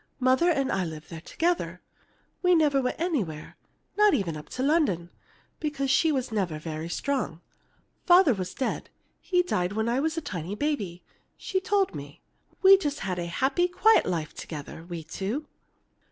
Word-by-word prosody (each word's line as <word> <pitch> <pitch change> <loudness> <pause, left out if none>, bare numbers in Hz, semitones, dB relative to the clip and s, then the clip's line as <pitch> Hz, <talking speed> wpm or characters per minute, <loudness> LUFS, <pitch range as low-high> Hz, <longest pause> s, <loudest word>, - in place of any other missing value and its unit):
Mother 260 +7 +3
and 275 -5 +1
I 195 - 0
lived 160 -2 -7
there 165 -1 -7
together. 345 - -1 0.6
We 360 -1 +4
never 295 -4 +3
went 250 +3 -2
anywhere, 225 - -2 0.4
not 420 -1 +5
even 170 -6 -1
up 150 - -9
to 255 - -3
London, 250 - +1 0.5
because 275 -3 -1
she 320 +3 +4
was 260 -4 -1
never 190 -7 -1
very 155 +1 -5
strong. 255 - -2 0.7
Father 350 -6 +7
was 185 -3 -5
dead; 265 - -2 0.3
he 360 -1 +1
died 180 - -1
when 220 +1 -1
I 240 +3 +1
was 320 +3 -1
a - - +2
tiny 185 - -5
baby, 210 - -2 0.3
she 380 - -1
told 390 0 +1
me. - - -9 0.4
We 390 +1 +9
just 295 -5 -3
had 185 -2 -2
a 170 - -3
happy, 270 - +1
quiet 430 +5 +4
life 165 -4 -2
together, 155 +1 -8
we 170 -2 -5
two. 200 - -4
255 Hz, 170 wpm, -27 LUFS, -, 0.7 s, We